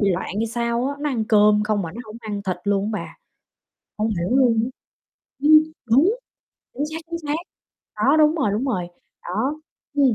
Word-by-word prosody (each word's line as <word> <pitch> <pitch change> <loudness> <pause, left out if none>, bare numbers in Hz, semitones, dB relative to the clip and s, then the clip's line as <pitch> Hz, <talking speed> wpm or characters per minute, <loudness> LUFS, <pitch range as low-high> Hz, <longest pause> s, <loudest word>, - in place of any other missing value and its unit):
bị 200 -2 +3
loạn 180 +1 -1
hay 225 +1 0
sao 235 +2 -1
á, 285 - -3
nó 295 - 0
ăn 225 -4 -1
cơm 210 -1 +4
không 210 -2 0
mà 165 +1 -5
nó 235 - -6
không 215 +1 -10
ăn 205 -2 -5
thịt 185 -2 -2
luôn 200 +1 0
á - - -2
bà, - - -11 0.8
hông 215 +1 +1
hiểu 175 - -2
luôn 240 -4 +4
á. 255 - -4 0.7
Ưm, 305 +1 +5 0.3
đúng, 275 - +5 0.6
chính 290 +4 -2
xác, 325 - -3
chính 335 - -2
xác, 295 - +1 0.6
đó, 290 +3 +3
đúng 305 +1 +5
rồi, 275 -10 +1
đúng 220 +5 -1
rồi. 185 -10 -1 0.3
Đó, 260 - -2 0.4
ừm, 270 -5 +4
225 Hz, 200 wpm, -22 LUFS, 210-275 Hz, 0.8 s, Ưm